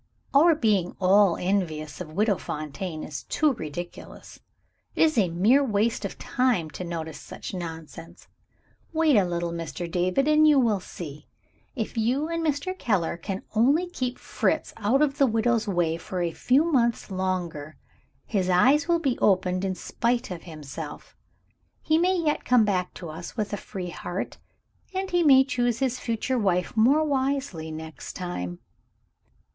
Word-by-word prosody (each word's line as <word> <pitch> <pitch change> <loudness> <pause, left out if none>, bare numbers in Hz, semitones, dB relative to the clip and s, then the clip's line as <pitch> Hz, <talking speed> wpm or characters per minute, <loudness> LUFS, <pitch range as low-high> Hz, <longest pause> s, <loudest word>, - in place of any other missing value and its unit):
Our 320 +4 +6
being 205 - +1
all 195 -1 +5
envious 175 -5 -2
of 160 -3 -7
Widow 205 +2 +2
Fontaine 155 +3 -5
is 145 - -6
too 305 -3 +2
ridiculous. 175 - -8 0.6
It - - +4
is 315 -1 +3
a 195 -6 +3
mere 210 +12 +4
waste 220 -2 0
of 200 - -5
time 240 -12 0
to 185 - -6
notice 165 -3 -5
such - - -8
nonsense. 165 -1 -8 0.7
Wait 315 -3 +3
a 205 - +5
little, 170 -1 -2
Mr. 165 -1 -5
David, 185 - +1
and 305 0 +5
you 300 -2 +6
will 225 -6 +3
see. 150 -5 -9 0.5
If 230 -1 -3
you 255 +7 +1
and 335 0 -2
Mr. 310 +4 -1
Keller 205 - 0
can 190 +3 -5
only 280 +11 +3
keep 255 -6 -3
Fritz - - -1
out 235 +7 +2
of 275 -2 -1
the 275 - +5
widow's 230 0 +1
way 175 -4 +1
for 180 +1 -4
a 170 - -1
few 255 - +3
months 235 -6 +1
longer, 180 -5 -3 0.5
his 190 -4 -1
eyes 265 - +4
will 340 -1 +3
be 275 -7 -1
opened 185 -1 +2
in 190 -1 -1
spite 235 +5 -1
of 170 -2 -7
himself. 155 -5 -8 0.6
He 315 +1 +2
may 365 +2 +2
yet 305 -3 0
come 245 -3 +4
back 185 -3 -1
to 170 - -7
us 165 +8 -8
with 210 -1 -2
a - - +2
free 190 -3 -6
heart, 175 +2 -5 0.6
and 380 0 -2
he 350 0 +3
may 270 -5 +7
choose 245 -4 0
his 255 -1 -1
future 235 +2 -1
wife 180 -3 0
more 265 +8 +4
wisely 270 - -1
next 160 0 -8
time." 90 - -5
205 Hz, 160 wpm, -26 LUFS, 175-265 Hz, 0.7 s, may